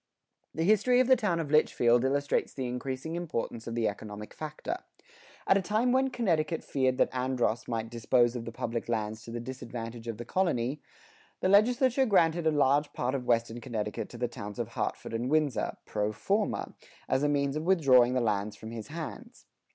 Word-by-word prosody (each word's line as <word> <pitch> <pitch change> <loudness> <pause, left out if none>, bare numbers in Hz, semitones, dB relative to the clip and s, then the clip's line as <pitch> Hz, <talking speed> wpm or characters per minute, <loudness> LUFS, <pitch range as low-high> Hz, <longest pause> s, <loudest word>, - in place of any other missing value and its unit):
The 160 - 0
history 215 +6 +4
of 255 - +5
the 260 +1 +6
town 210 -9 0
of 150 -3 -3
Litchfield 120 -5 +4
illustrates 140 +2 0
the 130 - -3
increasing 130 +5 -4
importance 150 -9 -4
of 115 - -4
the 115 -2 +1
economic 105 0 -6
factor. 155 - -5 0.7
At 195 - +4
a - - -2
time 215 +6 +1
when 265 +1 +3
Connecticut 170 -10 0
feared 130 -2 0
that - - +2
Andros 125 -3 0
might 115 -1 -3
dispose 120 +1 +2
of 120 -1 -4
the 115 - -5
public 115 0 -4
lands 110 -1 -2
to 115 - -8
the 120 - -4
disadvantage 120 -2 -7
of 115 -2 -4
the 120 - -7
colony, 145 -5 0 0.6
the 185 - +2
legislature 250 +6 +4
granted 170 -5 +3
a - - +4
large 145 0 +2
part 125 +1 -1
of 130 -3 -3
Western 115 0 +1
Connecticut 110 -5 -4
to 120 - -10
the 120 +1 0
towns 105 -4 -8
of 120 -2 -3
Hartford 115 - -4
and 120 +3 -1
Windsor, 155 -3 +1
pro 105 0 -1
forma, 200 - -1 0.3
as 130 - +1
a 145 - +2
means 140 -1 +1
of 155 - -1
withdrawing 130 -9 +5
the 130 - +2
lands 105 -2 -1
from 110 - -9
his 115 -2 -7
hands. 170 - -8
130 Hz, 190 wpm, -29 LUFS, 115-165 Hz, 0.7 s, the